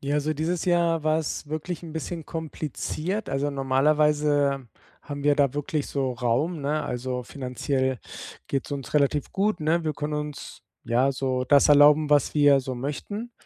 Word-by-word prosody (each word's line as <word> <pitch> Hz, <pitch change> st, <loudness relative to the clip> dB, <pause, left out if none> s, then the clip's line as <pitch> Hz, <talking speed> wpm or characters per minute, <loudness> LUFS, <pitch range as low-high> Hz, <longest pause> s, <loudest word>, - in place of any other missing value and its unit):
Ja, 140 Hz, +1 st, -2 dB
also 150 Hz, +1 st, 0 dB
dieses 160 Hz, +3 st, -2 dB
Jahr 170 Hz, -2 st, +2 dB
war 155 Hz, +1 st, +2 dB
es 150 Hz, -1 st, -4 dB
wirklich 155 Hz, +2 st, -4 dB
'n 160 Hz, -2 st, -8 dB
bisschen 160 Hz, 0 st, -5 dB
kompliziert. 160 Hz, -, -4 dB
Also 140 Hz, +2 st, -1 dB
normalerweise 145 Hz, 0 st, +2 dB, 0.3 s
haben 145 Hz, -1 st, -6 dB
wir 145 Hz, -1 st, +5 dB
da 140 Hz, -2 st, +2 dB
wirklich 145 Hz, 0 st, -2 dB
so 135 Hz, -2 st, -1 dB
Raum, 125 Hz, +8 st, -1 dB
ne? 150 Hz, +2 st, -1 dB
Also, 125 Hz, +1 st, -3 dB
finanziell 130 Hz, 0 st, -2 dB, 0.5 s
geht's 135 Hz, +1 st, -3 dB
uns 135 Hz, -4 st, -5 dB
relativ 145 Hz, 0 st, +1 dB
gut, 210 Hz, +2 st, +1 dB
ne? 160 Hz, +2 st, +1 dB
Wir 155 Hz, -, 0 dB
können 150 Hz, +1 st, -4 dB
uns, 150 Hz, -1 st, -6 dB, 0.2 s
ja, 125 Hz, +4 st, +2 dB
so 130 Hz, -1 st, -1 dB
das 140 Hz, +3 st, +5 dB
erlauben, 150 Hz, +1 st, +6 dB
was 145 Hz, 0 st, +3 dB
wir 145 Hz, -2 st, +5 dB
so 130 Hz, 0 st, -5 dB
möchten. 205 Hz, -, -5 dB
145 Hz, 165 wpm, -25 LUFS, 135-155 Hz, 0.5 s, erlauben